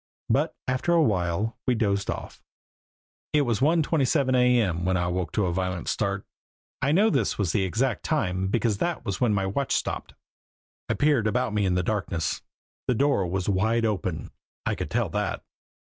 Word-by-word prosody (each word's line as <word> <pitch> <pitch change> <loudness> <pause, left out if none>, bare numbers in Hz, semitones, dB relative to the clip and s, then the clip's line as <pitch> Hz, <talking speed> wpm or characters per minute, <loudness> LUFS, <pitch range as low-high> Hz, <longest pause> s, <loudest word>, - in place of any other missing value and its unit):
But - - +1
after 130 +7 +1
a 165 -1 +5
while 100 - 0
we 125 - +3
dozed 100 -3 0
off. - - -5 0.9
It 150 -1 +4
was 120 -5 0
one 160 +3 +4
twenty 150 -1 +1
seven 130 +1 +2
A. 125 -1 +4
M. 90 -6 0
when 95 0 +1
I 85 - 0
woke 90 -1 -3
with 105 - +3
a 90 - 0
violent 90 -2 -2
start. - - -1 0.6
I 140 - +2
know 205 +8 +4
this 130 -8 +1
was 95 -6 0
the 95 0 +1
exact 115 +7 0
time 95 - 0
because 110 0 0
that 175 -1 -2
was 95 -1 -3
when 120 -3 +3
my 100 -2 +1
watch 115 +8 0
stopped. - - -3 0.7
I - - +1
peered 145 -7 +2
about 120 0 0
me 105 -2 +1
in 90 - +1
the 90 - +1
darkness. 90 -6 -2 0.5
The 125 - +2
door 135 -7 +2
was 90 +1 -2
wide 110 +4 +2
open 95 -8 -2 0.3
I - - +1
could - - -4
tell - - 0
that. - - -2
105 Hz, 195 wpm, -26 LUFS, 95-130 Hz, 0.9 s, a